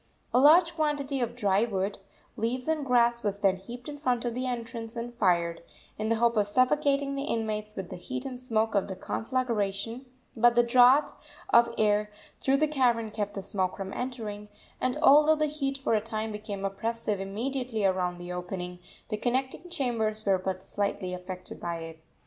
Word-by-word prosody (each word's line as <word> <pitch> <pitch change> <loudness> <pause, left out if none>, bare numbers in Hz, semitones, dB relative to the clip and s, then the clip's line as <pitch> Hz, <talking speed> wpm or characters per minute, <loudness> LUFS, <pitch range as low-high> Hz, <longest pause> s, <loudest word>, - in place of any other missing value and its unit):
A 250 - +5
large 330 +4 +6
quantity 290 -4 0
of 240 0 -2
dry 205 -3 +2
wood, 200 -3 -2 0.4
leaves 250 +4 -2
and 315 -2 0
grass 240 -2 +3
was 205 -2 -1
then 195 -2 +2
heaped 240 +6 -10
in 290 -1 -7
front 250 -4 0
of 240 - -1
the 255 +2 -2
entrance 230 -1 -5
and 235 +1 -5
fired, 170 -6 +1 0.3
in 215 +1 -2
the 230 - +3
hope 235 0 +2
of 205 -1 +3
suffocating 275 +4 +2
the 275 0 -3
inmates 215 -5 -2
with 190 -2 -6
the - - -5
heat 255 +8 -5
and 255 -2 -5
smoke 225 -3 0
of 200 -2 +1
the 190 - -5
conflagration; 225 0 -2 0.3
but 240 +1 +4
the 240 - +6
draught 250 +4 +5 0.4
of 235 0 +6
air 210 -1 +2 0.3
through 270 +1 +2
the 310 +2 +3
cavern 240 -6 +1
kept 205 -1 -3
the 195 - -4
smoke 185 -2 -2
from 195 -1 -5
entering, 215 -5 -5 0.3
and, 255 +2 0
although 305 +2 +7
the 305 0 +1
heat 280 -2 -2
for 265 -4 -1
a 215 - +3
time 220 0 -3
became 210 -2 -5
oppressive 215 +1 -2
immediately 225 +3 -2
around 180 -2 +1
the 175 0 -7
opening, 180 0 -5 0.3
the 215 - -1
connecting 260 +9 -2
chambers 220 -8 -1
were 195 -2 +3
but 185 0 -3
slightly 200 -2 -2
affected 180 0 -6
by 170 -1 -3
it. 165 -1 -9
230 Hz, 185 wpm, -28 LUFS, 200-255 Hz, 0.4 s, although